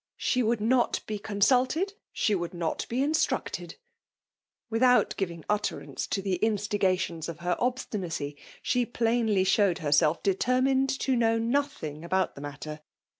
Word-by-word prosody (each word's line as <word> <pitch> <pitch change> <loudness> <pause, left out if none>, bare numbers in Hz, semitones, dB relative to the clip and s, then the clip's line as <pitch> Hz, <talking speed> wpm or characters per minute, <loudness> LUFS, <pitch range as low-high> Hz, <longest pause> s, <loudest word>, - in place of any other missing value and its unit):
She 255 - +1
would 230 0 +1
not 240 +2 +2
be 215 -1 -4
consulted, 255 - +2
— - - -66
she 215 - +1
would 175 -2 -2
not 170 -2 -2
be 250 +3 0
in 295 - +1
structed: 315 0 -1 0.5
— - - -66
without 250 +2 +4
giving 170 -5 -4
utterance 210 0 -2
to 195 - -2
the 190 -2 0
in 220 -1 +3
stigations 185 -5 -1
of 170 0 -8
her 175 0 0
obstinacy, 190 - -2 0.3
she 250 -1 +2
plainly 230 -4 +1
showed 190 -1 +3
herself 150 -1 +2
determined 255 +7 +2
to 265 - +1
know 230 -1 +2
nodiing 230 - -2
about 185 +1 0
the 140 - -10
matter. 145 +1 -7
210 Hz, 155 wpm, -28 LUFS, 175-245 Hz, 0.5 s, without